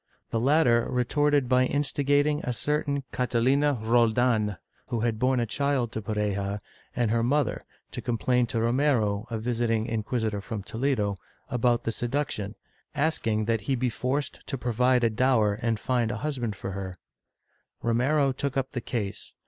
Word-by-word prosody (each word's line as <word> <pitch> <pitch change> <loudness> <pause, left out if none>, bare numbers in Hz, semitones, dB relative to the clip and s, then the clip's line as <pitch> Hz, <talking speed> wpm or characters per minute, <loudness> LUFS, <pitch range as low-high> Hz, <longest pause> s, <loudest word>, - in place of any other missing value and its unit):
The 115 - +1
latter 125 -3 +3
retorted 140 +2 +2
by 130 0 +4
instigating 145 +1 +1
a 125 - -1
certain 140 +3 -1
Catalina 130 +4 +2
Roldan, 115 -2 +2 0.3
who 115 -2 -2
had 115 -2 0
borne 130 +1 +2
a 120 - +1
child 135 -1 0
to 110 - -4
Pareja, 100 -1 -2 0.4
and 120 -3 +1
her 115 0 +2
mother, 130 +1 +1 0.3
to - - -5
complain 125 +1 +1
to 115 - -1
Romero, 115 -3 +1
a 115 - -2
visiting 115 -1 0
inquisitor 110 -2 -2
from 105 -1 -5
Toledo, 110 -5 -1 0.3
about 120 -1 +2
the 115 - -1
seduction, 120 -4 -2 0.4
asking 115 -8 +1
that 115 -1 0
he 130 +6 0
be 125 0 0
forced 130 +5 -2
to 135 - -3
provide 125 +1 +2
a 115 - +4
dower 110 -3 +3
and 115 -3 0
find 120 -2 0
a 110 - -3
husband 125 -8 -2
for 95 0 -5
her, 95 -1 -5 0.9
Romero 135 +5 +2
took 135 +1 -2
up 135 -1 -1
the 125 - -3
case. 105 -6 -4
120 Hz, 155 wpm, -27 LUFS, 110-135 Hz, 0.9 s, by